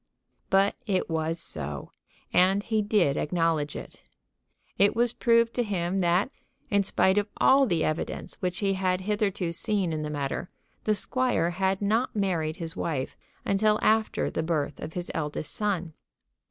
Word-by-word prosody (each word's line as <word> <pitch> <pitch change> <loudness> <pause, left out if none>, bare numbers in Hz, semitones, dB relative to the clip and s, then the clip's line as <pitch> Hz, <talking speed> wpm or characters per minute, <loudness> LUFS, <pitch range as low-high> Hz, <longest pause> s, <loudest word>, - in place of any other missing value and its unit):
But 195 +1 +3
it 190 -4 0
was 160 +1 +1
so, 75 - -2 0.4
and 190 +3 +4
he 220 -1 0
did 205 -9 +2
acknowledge 160 -2 0
it. - - -9 0.8
It 200 +2 +4
was 240 0 +2
proved 230 -1 +3
to 245 - +1
him 190 -3 -1
that, 180 +7 +2 0.4
in 200 -1 +4
spite 190 0 +2
of 205 0 -3
all 270 0 +5
the 170 -6 +1
evidence 155 +1 -3
which 180 0 -1
he 195 - +2
had 185 -1 0
hitherto 200 -3 -1
seen 195 -2 -1
in 155 - -2
the 150 - -3
matter, 145 +4 -3 0.4
the 215 - +3
squire 245 -6 +1
had 190 +2 0
not 225 +5 +1
married 170 -6 0
his 165 -1 -4
wife 140 -6 -3 0.3
until 210 +2 +3
after 220 0 +2
the - - -1
birth 150 -4 -2
of 160 - -6
his 175 -1 -4
eldest 150 -1 -3
son. 185 -6 -2
185 Hz, 160 wpm, -27 LUFS, 165-210 Hz, 0.8 s, all